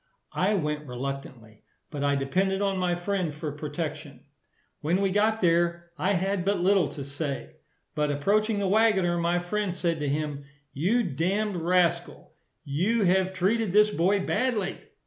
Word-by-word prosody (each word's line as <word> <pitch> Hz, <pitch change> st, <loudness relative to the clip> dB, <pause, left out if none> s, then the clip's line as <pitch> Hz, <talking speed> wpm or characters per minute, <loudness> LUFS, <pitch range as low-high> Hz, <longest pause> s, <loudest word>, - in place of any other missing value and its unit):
I 200 Hz, +3 st, +1 dB
went 150 Hz, -4 st, -2 dB
reluctantly; 125 Hz, -4 st, -7 dB, 0.3 s
but 145 Hz, -3 st, -4 dB
I 140 Hz, 0 st, +2 dB
depended 190 Hz, +8 st, 0 dB
on 195 Hz, -2 st, 0 dB
my 180 Hz, -1 st, +1 dB
friend 180 Hz, -2 st, -2 dB
for 150 Hz, 0 st, -4 dB
protection. 150 Hz, 0 st, -6 dB, 0.6 s
When 170 Hz, +5 st, 0 dB
we 195 Hz, -1 st, +1 dB
got 220 Hz, +3 st, +2 dB
there, 170 Hz, 0 st, +1 dB
I 185 Hz, +6 st, 0 dB
had 190 Hz, 0 st, 0 dB
but 200 Hz, +1 st, +1 dB
little 190 Hz, +1 st, +3 dB
to 140 Hz, -, -6 dB
say; 140 Hz, 0 st, -5 dB, 0.4 s
but 150 Hz, -1 st, 0 dB
approaching 205 Hz, +9 st, +1 dB
the 200 Hz, -1 st, 0 dB
waggoner, 190 Hz, -4 st, +3 dB
my 170 Hz, +1 st, +1 dB
friend 185 Hz, +1 st, -2 dB
said 170 Hz, -3 st, -1 dB
to 145 Hz, -1 st, -1 dB
him, 145 Hz, -1 st, -3 dB, 0.3 s
"You 200 Hz, -, +1 dB
damn'd 190 Hz, +5 st, -1 dB
rascal, 175 Hz, +1 st, 0 dB, 0.3 s
you 190 Hz, +11 st, +1 dB
have 190 Hz, 0 st, +2 dB
treated 190 Hz, +2 st, 0 dB
this 210 Hz, 0 st, +5 dB
boy 190 Hz, +2 st, +1 dB
badly." 225 Hz, -7 st, -1 dB
175 Hz, 155 wpm, -27 LUFS, 150-200 Hz, 0.6 s, this